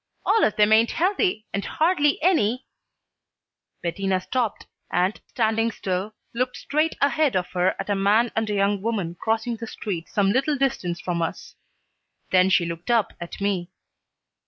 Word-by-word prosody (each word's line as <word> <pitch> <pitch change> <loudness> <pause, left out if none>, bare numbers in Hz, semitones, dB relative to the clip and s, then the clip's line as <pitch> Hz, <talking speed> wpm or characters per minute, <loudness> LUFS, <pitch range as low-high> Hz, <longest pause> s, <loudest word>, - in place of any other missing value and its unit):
All 450 - +3
of 210 - +2
them 210 0 +4
ain't 225 +1 +5
healthy, 365 - +1
and 200 - -1
hardly 310 -3 +2
any 255 - +2 0.6
" - - -58
Bettina 185 +2 0
stopped 230 +3 -2 0.3
and, 180 +4 0
standing 225 -1 +1
still, 195 +1 -3 0.2
looked 250 +1 -1
straight 310 +2 0
ahead 285 -3 +2
of 180 -1 -1
her 180 +1 +1
at - - -5
a 205 - +1
man 205 +4 +3
and 225 -1 0
a 210 - 0
young 200 0 +1
woman 200 -6 -2
crossing 225 +1 -1
the 230 - -7
street 180 -6 -5
some 200 -3 +2
little 275 +5 +1
distance 185 -10 -1
from 175 -2 -2
us. 165 - -4 0.8
Then 185 0 +5
she 180 -2 +3
looked 170 +4 -6
up 230 -4 +2
at 170 - -7
me. 195 -3 -1
215 Hz, 165 wpm, -24 LUFS, 190-250 Hz, 0.8 s, ain't